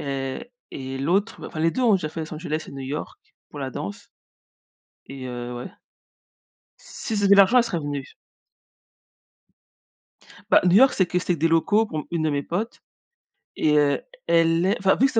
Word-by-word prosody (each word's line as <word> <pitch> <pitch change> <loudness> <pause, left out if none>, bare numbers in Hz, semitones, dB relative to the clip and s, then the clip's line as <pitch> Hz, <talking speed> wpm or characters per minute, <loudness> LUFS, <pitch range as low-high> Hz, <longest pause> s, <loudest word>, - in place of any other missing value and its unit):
Heu 135 - -4 0.3
et 135 0 -6
l'autre, 190 +10 0
bah - - -7
enfin 155 - -6
les 165 +1 +3
2, 260 - -2
ont 230 -3 +4
déjà 175 -5 -1
fait 160 +1 -6
Los 160 +1 -6
Angeles 155 -1 -4
et - - -10
New 140 - -8
York 140 +3 -5 0.3
pour 145 - -9
la 135 -2 -4
danse. 100 -3 -7 1.0
Et 135 -1 -7
heu, 120 0 -5
ouais. 120 - -7 1.1
Si 225 -4 -6
c'est 200 -1 +2
de 200 - +8
l'argent, 200 +5 +6
elle 240 - +4
serait 175 -7 -2
venue. 145 -2 -4 2.5
Bah, - - +7
New 180 0 +4
York, 265 +3 +7
c'est 185 - +2
que 180 - 0
c'est 180 -1 -1
des 165 +2 +2
locaux 205 +7 +3
pour 155 -7 -5
une 170 -2 -1
de 155 - +1
mes 140 0 -1
potes 210 - -4 0.8
et 150 -1 +2
heu, 145 -1 +2 0.3
elle 165 +1 +3
est 195 - +2
enfin, 195 0 +3
vu 270 - +3
que - - -4
c'est 225 - +3
165 Hz, 195 wpm, -24 LUFS, 140-195 Hz, 2.5 s, de